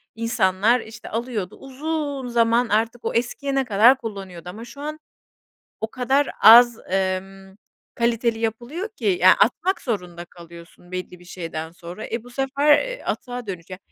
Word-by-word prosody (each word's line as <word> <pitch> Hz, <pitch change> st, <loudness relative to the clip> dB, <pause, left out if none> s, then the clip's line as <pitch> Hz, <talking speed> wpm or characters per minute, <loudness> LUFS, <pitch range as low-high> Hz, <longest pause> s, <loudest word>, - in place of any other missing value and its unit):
insanlar, 225 Hz, 0 st, +2 dB
işte, 220 Hz, 0 st, -11 dB
alıyordu 225 Hz, -5 st, -4 dB
uzun 285 Hz, 0 st, -4 dB
zaman 235 Hz, 0 st, +2 dB
artık 225 Hz, +3 st, 0 dB
o -, -, -1 dB
eskiyene 270 Hz, +3 st, -1 dB
kadar 235 Hz, +4 st, +5 dB
kullanıyordu 195 Hz, -7 st, -8 dB
ama 220 Hz, +6 st, -8 dB
şu 280 Hz, +4 st, -12 dB
an 305 Hz, +1 st, -5 dB, 0.8 s
o 220 Hz, -, -3 dB
kadar 265 Hz, +4 st, +1 dB
az, 235 Hz, +2 st, +9 dB
emm, 190 Hz, 0 st, -3 dB, 0.4 s
kaliteli 235 Hz, -1 st, 0 dB
yapılıyor 240 Hz, -, -3 dB
ki 235 Hz, -, -10 dB, 0.2 s
ya, 185 Hz, -, +8 dB
atmak 360 Hz, -, +2 dB
zorunda 180 Hz, -7 st, -4 dB
kalıyorsun 170 Hz, +1 st, -15 dB
belli 180 Hz, 0 st, -6 dB
bir 180 Hz, -, -17 dB
şeyden 165 Hz, -3 st, -6 dB
sonra. 175 Hz, +4 st, -9 dB
E, 230 Hz, 0 st, -3 dB
bu 245 Hz, -, -13 dB
sefer, 280 Hz, +3 st, +3 dB, 0.2 s
ııı, -, -, -15 dB
atığa 245 Hz, -2 st, -4 dB
dönüce 185 Hz, -1 st, -7 dB
230 Hz, 145 wpm, -23 LUFS, 185-250 Hz, 0.8 s, az